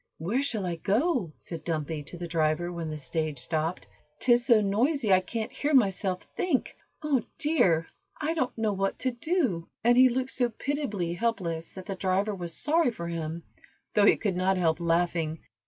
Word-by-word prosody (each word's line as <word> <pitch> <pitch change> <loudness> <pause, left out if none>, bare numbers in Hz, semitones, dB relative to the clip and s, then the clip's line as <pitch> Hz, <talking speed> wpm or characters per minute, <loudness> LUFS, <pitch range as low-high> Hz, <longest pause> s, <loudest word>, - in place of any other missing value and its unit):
"Where 205 - 0
shall 225 -9 -1
I 175 -2 -2
go," 220 - +1
said 165 -3 -8
Dumpy 155 -2 -2
to 175 - -8
the 175 0 -5
driver, 165 +1 0
when 165 -2 -4
the 155 - -4
stage 155 0 -2
stopped. 160 +6 -2 0.3
"'Tis 240 -1 +3
so 230 -3 +7
noisy 215 +3 +2
I 185 - +6
can't 220 +4 -4
hear 290 0 0
myself 195 -5 +2
think. 320 -8 0 0.3
Oh, 285 -5 +2 0.2
dear! 290 - +2 0.3
I 310 +1 0
don't 260 -8 -1
know 220 -2 +1
what 195 0 -1
to 260 - 0
do," 240 - -1 0.2
and 240 +1 +5
he 255 +1 +7
looked 255 +1 -1
so 245 -2 +1
pitiably 225 - -2
helpless 175 -6 -2
that 185 -1 -9
the 200 - -3
driver 190 +2 0
was 175 -4 -5
sorry 315 -1 +3
for 170 -8 -6
him, 165 0 -4 0.5
though 205 -1 +5
he - - +6
could 200 -5 -1
not 185 +1 +2
help 165 -2 +2
laughing. 170 -1 +1
195 Hz, 185 wpm, -28 LUFS, 170-245 Hz, 0.5 s, so